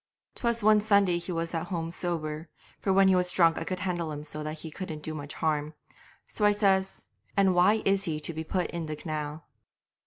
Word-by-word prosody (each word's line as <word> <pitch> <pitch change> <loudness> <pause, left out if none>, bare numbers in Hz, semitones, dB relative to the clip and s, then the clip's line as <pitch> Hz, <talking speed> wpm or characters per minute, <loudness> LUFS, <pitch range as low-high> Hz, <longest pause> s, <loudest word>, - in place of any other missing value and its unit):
'Twas 235 -2 -1
one 215 0 +6
Sunday 200 -4 +3
that 170 - -7
he - - -3
was 165 0 -2
at 165 +1 -2
home 165 -4 -3
sober 160 -2 -3 0.3
for 195 - 0
when 195 0 +5
he 190 - +5
was 180 0 +2
drunk 170 -3 +4
I - - -3
could 185 -1 -4
handle 175 -4 -2
him 150 0 -6
so 150 0 -7
that 155 +1 -5
he 160 - -7
couldn't 160 -4 -6
do 155 - -3
much 145 -1 -6
harm. 155 -1 -1 0.5
So 210 -1 +2
says 195 -2 +1 0.3
I, - - +6
"And 190 -1 +4
why 195 +5 +4
is 195 0 +2
he 155 -3 -2
to 165 - -1
be 160 +1 -4
put 180 +2 -2
in 170 -2 -4
the 155 - -3
canal?" 150 0 -5
170 Hz, 225 wpm, -28 LUFS, 155-190 Hz, 0.5 s, one